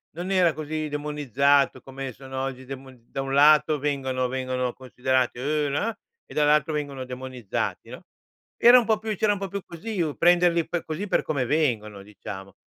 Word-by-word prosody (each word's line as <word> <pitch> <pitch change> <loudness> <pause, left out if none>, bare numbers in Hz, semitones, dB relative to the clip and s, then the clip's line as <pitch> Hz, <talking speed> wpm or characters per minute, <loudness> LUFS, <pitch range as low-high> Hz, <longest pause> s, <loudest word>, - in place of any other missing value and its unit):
non 180 +3 -4
era 180 -4 +4
così 155 0 -4
demonizzato 145 -2 +1
come 135 -1 -7
sono 130 +2 -6
oggi 130 -1 -5
demon 130 -1 -10
da 135 - -3
un 135 0 -4
lato 150 +2 +5
vengono 130 -3 -1
vengono 130 -1 -2
considerate, 130 -1 -1
"Uuh, 150 +2 0
no" 210 +11 -1 0.3
e - - -13
dall'altro 150 0 +3
vengono 140 -3 -4
demonizzati, 125 -3 -4
no. - - -9 0.6
Era 240 +2 +8
un 235 - -1
po' 220 -1 +2
più 220 -1 -3
c'era 210 -1 +3
un 200 - -5
po' 195 - -3
più 200 +1 -4
così 180 +3 -5
u 155 -3 -2
prenderli 175 -1 +4
per 175 -2 -3
così 160 +6 -4
per - - +2
come 135 -5 -1
vengono 115 -9 0
diciamo. 95 -2 -9
140 Hz, 180 wpm, -25 LUFS, 130-160 Hz, 0.6 s, Era